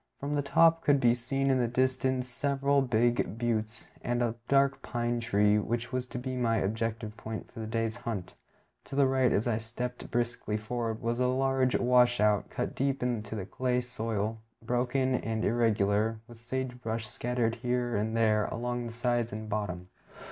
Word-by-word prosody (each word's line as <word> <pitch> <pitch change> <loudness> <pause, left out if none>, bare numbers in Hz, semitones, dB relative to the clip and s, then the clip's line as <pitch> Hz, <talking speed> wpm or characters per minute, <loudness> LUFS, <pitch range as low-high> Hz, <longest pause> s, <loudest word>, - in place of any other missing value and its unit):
From 140 +1 -3
the 145 - +1
top 165 +4 +4
could 145 -1 +4
be 120 -2 +5
seen 135 +3 0
in 130 - +3
the 120 - +2
distance 130 +1 0
several 140 +2 +1
big 120 -3 +1
buttes, 115 -1 -2
and 120 0 0
a 115 -2 0
dark 140 0 +3
pine 120 0 -1
tree, 105 -2 +3
which 120 +3 -3
was 125 0 -1
to 125 - -6
be 130 +1 -4
my 115 -2 +1
objective 110 +1 -2
point 110 0 -6
for 120 - -10
the 110 - -4
day's 115 +1 -1
hunt. 105 -7 -5 0.5
To 135 - -7
the 140 0 +5
right, 130 -2 +3
as 110 - +1
I 110 -2 +1
stepped 120 +2 -5
briskly 120 -3 -1
forward, 115 +1 -3
was 120 +1 0
a 125 - +3
large 130 0 +2
washout, 120 -4 +3
cut - - -3
deep 135 -1 -1
into 115 -3 -2
the 100 -4 -4
clay 125 +4 0
soil, 110 -3 -2 0.2
broken 125 +2 +1
and 110 -2 -1
irregular, 110 -1 +2
with 120 -1 -14
sage 125 +1 -4
brush 115 -1 -3
scattered 115 +1 -1
here 125 -1 -1
and 110 +2 0
there 110 -2 +3
along 120 +1 -3
its 115 - -8
sides 120 -1 0
and 110 +1 -6
bottom. 95 -4 -3
120 Hz, 180 wpm, -30 LUFS, 110-125 Hz, 0.5 s, be